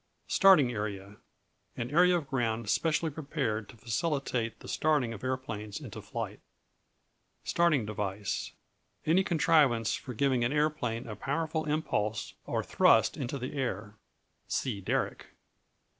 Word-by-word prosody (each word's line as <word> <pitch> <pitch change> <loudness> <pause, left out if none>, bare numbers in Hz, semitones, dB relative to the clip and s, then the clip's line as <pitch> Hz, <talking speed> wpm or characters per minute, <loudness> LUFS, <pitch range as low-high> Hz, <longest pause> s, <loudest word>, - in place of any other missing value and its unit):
Starting 185 -11 +6
Area 105 -2 -5 0.6
An 120 +2 -3
area 180 +3 +5
of 155 -5 -5
ground 115 -4 -1
specially 160 +5 +1
prepared 135 -8 -3
to - - -13
facilitate 120 -2 -1
the - - -11
starting 145 -7 +1
of 110 - -10
aeroplanes 110 -6 -4
into - - -8
flight. - - -5 1.0
Starting 160 -9 +2
Device 100 -1 -3 0.5
Any 175 +5 +4
contrivance 150 - +3
for 125 - -5
giving 130 0 +2
an 120 - +1
aeroplane 150 -6 0
a 105 - -5
powerful 155 +7 -2
impulse 110 -9 -1
or - - -1
thrust 110 -1 +4
into 140 -2 -3
the 130 0 -5
air. 110 -7 -3 0.5
See 110 -7 -2
Derrick. 90 - -1
125 Hz, 130 wpm, -30 LUFS, 110-155 Hz, 1.0 s, Starting